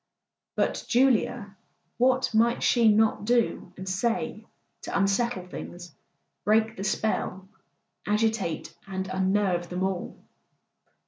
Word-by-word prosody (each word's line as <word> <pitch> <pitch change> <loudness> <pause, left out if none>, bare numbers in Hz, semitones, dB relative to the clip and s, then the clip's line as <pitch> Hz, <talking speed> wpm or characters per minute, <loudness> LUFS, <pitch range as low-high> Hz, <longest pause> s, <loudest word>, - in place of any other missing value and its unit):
But - - 0
Julia—what 245 +1 0
might 235 +2 +3
she 235 -2 +4
not 215 0 +2
do 235 -5 +1
and 190 +1 -7
say 220 +5 -2 0.3
to - - -3
unsettle 195 0 +1
things, 175 -2 -9 0.5
break 220 +1 +2
the 195 - -6
spell, 195 -2 -1 0.6
agitate 210 -6 0
and 190 -1 -3
un¬ 190 0 -1
nerve 190 -3 +1
them 180 +1 -2
all? 190 -2 -3
205 Hz, 110 wpm, -27 LUFS, 190-230 Hz, 0.6 s, she